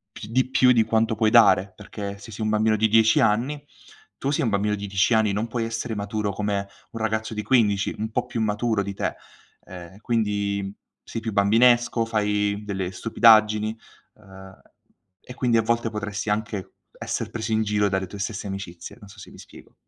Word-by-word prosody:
Pi - - -8
di 130 +2 +1
più 125 -1 +4
di 115 -2 +4
quanto 110 0 +1
puoi 110 0 +2
dare, 105 -4 +5
perché 100 -1 -7
se 100 +3 -12
sei 110 +1 -5
un 110 - 0
bambino 110 0 +2
di 110 +1 +2
10 110 0 +4
anni, 135 +8 0 0.5
tu 135 - -3
sei 150 +2 0
un 120 - +1
bambino 105 0 0
di 100 0 -6
10 95 +4 +1
anni, 110 -2 +3
non 105 +3 -2
puoi 115 0 -3
essere 115 0 -4
maturo 105 0 -3
come 100 -1 -2 0.2
un 115 - -7
ragazzo 110 0 -2
di 105 - -3
15, 105 -6 +2
un 110 +1 -4
po' 125 +2 -1
più 115 - -4
maturo 110 0 0
di 100 0 -5
te. - - -3 0.5
Ehm, 90 0 -11
quindi 100 -3 -1 0.3
sei 115 - -6
più 110 0 -4
bambinesco, 115 +4 +3
fai 105 -2 0
delle 95 -3 -3
stupidaggini, 110 +1 +3 0.4
uhm, 95 -2 -15 0.6
e 125 - -11
quindi 125 -2 +1
a - - +4
volte 115 +1 0
potresti 105 -1 -4
anche 105 -2 -3 0.2
esser - - -4
preso 110 0 -5
in 110 0 +2
giro 105 -1 +1
dalle 95 -1 -1
tue 100 +3 -10
stesse 100 +1 -4
amicizie, 95 -2 -8
non 105 - -14
so 95 - -16
se - - -12
mi - - -14
spiego. - - -15
105 Hz, 195 wpm, -24 LUFS, 100-115 Hz, 0.6 s, dare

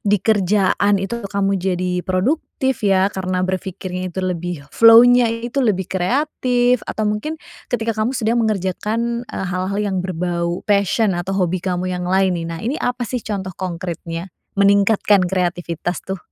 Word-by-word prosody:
di 205 0 +2
kerjaan 205 0 +2
itu 195 +5 -3
kamu 195 -1 0
jadi 180 -1 -1
produktif 260 - -1
ya 195 -1 +2
karena 185 -1 -1
berpikirnya 185 0 -4
itu 185 +1 -4
lebih 175 -4 -3
flow-nya 235 +1 +7
itu 235 +4 -2
lebih 205 -6 +1
kreatif, 245 - +1
atau 215 - -2
mungkin 210 +10 -2 0.3
ketika 230 -2 -1
kamu 240 +4 0
sedang 225 +2 +1
mengerjakan, 220 +3 -1
eee, - - -4
hal-hal 185 +2 -2
yang 200 -3 -1
berbau 175 -1 -2
passion 200 +1 +2
atau 180 +2 -2
hobi 180 -1 0
kamu 185 0 -2
yang 180 0 -3
lain 190 0 +3
nih. 170 -2 -3
Nah, 165 - -5
ini 260 +6 -2
apa 245 0 -1
sih 250 +2 -3
contoh 195 -4 -4
kongkritnya 170 -1 -5 0.2
meningkatkan 200 0 +4
kreativitas 175 -1 -2
tuh? 190 0 -5
195 Hz, 150 wpm, -20 LUFS, 180-225 Hz, 0.3 s, flow-nya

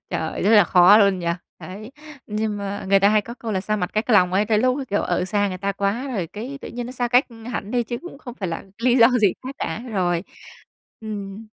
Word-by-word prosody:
Trời, - - -3
rất 205 - +3
là 210 -4 +7
khó 180 +4 +6
luôn 200 -3 +3
nhỉ! 170 - -5 0.3
Đấy. 210 +6 -9 0.4
Nhưng 210 0 -2
mà 200 0 -5
người 195 0 +5
ta 200 - +5
hay 215 0 +4
có 235 +3 -9
câu 230 -3 -5
là 190 - 0
xa 215 +2 -1
mặt 180 -3 -2
cách 215 +3 -1
lòng 180 -4 +4
ấy 200 +2 +2
tới 215 -1 +2
lúc, 255 +4 +2
kiểu, 205 - +1
ở 180 - 0
xa 205 +1 0
người 185 - -5
ta 200 +1 -2
quá 200 +7 -2
rồi 200 -10 -2
cái 240 - -7
tự - - -8
nhiên 240 0 -5
nó 250 - -7
xa 245 -1 -2
cách 250 +3 +4 0.3
hẳn 200 0 -4
đi 245 -1 +1
chứ 240 +1 -5
cũng 350 -5 -10
không 245 -5 -9
phải 190 -7 -4
là 165 - -5 0.2
lý 250 0 +4
do 230 -2 +7
gì 200 -4 +4
khác 265 +2 -7
cả. 165 - -3
Rồi. 175 -3 0 0.8
Ừm. 210 0 -7
210 Hz, 255 wpm, -22 LUFS, 195-235 Hz, 0.8 s, là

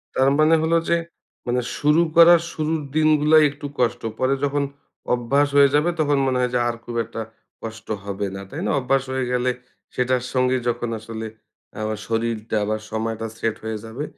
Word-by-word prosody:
তার 135 +1 +4
মানে 155 +1 +5
হলো 165 +1 +3
যে, 170 - +4 0.5
মানে 125 +1 +1 0.2
শুরু 150 +3 +3
করার 170 0 +8
শুরুর 155 0 -1
দিনগুলায় 155 0 +5
একটু 145 0 -10
কষ্ট। 120 -2 +1 0.2
পরে 130 +1 +2
যখন 145 0 +1 0.5
অভ্যাস 135 +4 +2
হয়ে 140 0 +7
যাবে 150 +4 +3
তখন 145 -2 +2
মনে 130 -1 +1
হয় 125 -1 0
যে 125 - +2
আর 120 - -1
খুব 120 - -6
একটা 115 0 -6 0.4
কষ্ট 115 0 -8 0.2
হবে 100 0 -3
না। 100 - -6
তাই - - -6
না? - - 0
অভ্যাস 135 +1 +1
হয়ে 130 -1 -1
গেলে 125 0 +1 0.4
সেটার 125 0 +1
সঙ্গে 130 0 +2
যখন 120 0 -1
আসলে 110 0 -7 0.6
আবা 110 0 -2
শরীরটা 115 -1 -2
আবার 110 +1 -1
সময়টা 110 0 -3
সেট 115 -1 -1
হয়ে 110 0 -3
যাবে 115 +6 -6
125 Hz, 180 wpm, -22 LUFS, 115-145 Hz, 0.6 s, করার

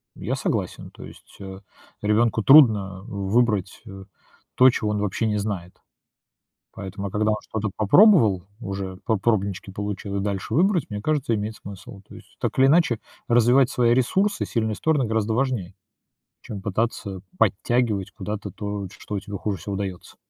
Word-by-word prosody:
я - - -3
согласен. - - -3
То - - -12
есть, - - -14
э, 95 -1 -9 0.4
ребенку 110 +1 +2
трудно 105 -10 +6
выбрать, 100 0 0
э, 95 -1 -9 0.5
то, 130 +1 +7
чего 110 -4 -1
он 105 - -1
вообще 105 +2 -1
не 105 -1 0
знает. 100 -4 -4 1.0
Поэтому 100 0 -6
а - - -10
когда 105 +1 +1
он - - 0
что-то 110 -1 -4
попробовал 110 - +5 0.2
уже, 95 -3 -5
по 110 -3 +1
пробнички 100 -3 -1
получил, 100 0 -5
и 100 - 0
дальше 100 -2 -3
выбрать, 180 -1 +2
мне 105 -1 -5
кажется, 145 -5 0
имеет 110 +1 -3
смысл. 100 0 -11
То - - -13
есть, - - -16
так - - -2
или 130 - +6
иначе, 140 -6 +3 0.3
развивать 120 +2 +4
свои 120 -1 +2
ресурсы, 190 - +1
сильные 110 -2 -1
стороны, 155 -4 +1
гораздо 110 -1 0
важнее, 120 -8 -1 0.7
чем 105 - -7
пытаться 100 -2 -2 0.2
подтягивать 110 -1 +1
куда-то 105 0 -6
то, 100 +1 -5
ш - - -15
что 105 - -6
у 100 - -2
тебя 100 +1 -7
хуже 100 -1 -2
всего 100 +4 -5
даётся. 95 -3 -6
105 Hz, 165 wpm, -23 LUFS, 100-120 Hz, 1.0 s, то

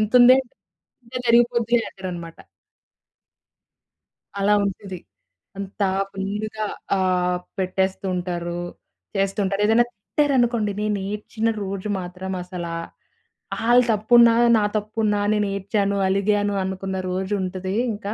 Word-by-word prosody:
ఇంతుందే, 245 +4 +7 0.6
తింటే 245 +1 -7
జరిగిపోద్దంటారనమాట. 230 -8 +1 2.0
అలా 205 +1 +3
ఉంటది. 190 -1 -5 0.6
అంతా 195 0 -2 0.2
ఫుల్‌గా 210 +3 -3 0.3
ఆహ్, 180 -1 +1 0.2
పెట్టేస్తూ 190 +1 -1
ఉంటారు. 175 -1 -3 0.6
చేస్తుంటారు 195 0 0
ఏదైనా 225 +3 +4
తిట్టారనుకోండి. 240 -1 +1
నేనేడ్చిన 210 +2 -2
రోజు 195 +1 -4
మాత్రం 185 +1 -6
అసలా 175 -2 -6 0.9
ఆళ్ళు 245 +1 +6
తప్పున్నా, 230 +2 +6 0.2
నా 215 - +2
తప్పున్నా 210 0 0
నేనేడ్చాను, 200 0 0
అలిగాను 205 +1 +1
అనుకున్న 190 0 -3
రోజుంటదింకా. 190 +3 -2
200 Hz, 85 wpm, -23 LUFS, 190-220 Hz, 2.0 s, ఇంతుందే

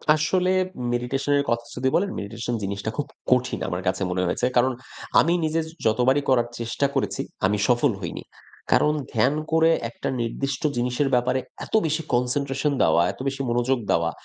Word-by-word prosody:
আসলে 180 +4 +1 0.4
মেডিটেশন 125 +4 -1
এর - - +1
কথা 115 0 0
যদি 125 +1 -1
বলেন, 195 +3 +2
মেডিটেশন 115 +4 -4
জিনিসটা 100 +2 -3
খুব 145 - -1 0.3
কঠিন 125 0 +2
আমার 90 +1 -3
কাছে 95 - 0
মনে 90 +1 0
হয়েছে। 105 - 0
কারণ 125 +2 +4 0.5
আমি 170 - +3
নিজে 155 +1 0 0.3
যতবারই 125 +6 +3
করার 120 -2 +3
চেষ্টা 120 +4 -1
করেছি, - - -1 0.2
আমি 105 +2 +2
সফল 125 +2 +3
হয়নি। 85 - -5 0.5
কারণ 150 - +4 0.2
ধ্যান 130 +3 +3 0.2
করে 160 0 +4 0.2
একটা 115 - -6
নির্দিষ্ট 130 +3 -2 0.2
জিনিসের 125 +3 0
ব্যাপারে 125 +1 +1 0.3
এত - - -17
বেশি 155 +1 0
কনসেনট্রেশন 135 +3 0
দেওয়া, 85 - +4
এত - - -16
বেশি 135 0 -2
মনোযোগ 120 +2 +1
দেওয়া, 85 0 +2
125 Hz, 165 wpm, -24 LUFS, 115-140 Hz, 0.5 s, কারণ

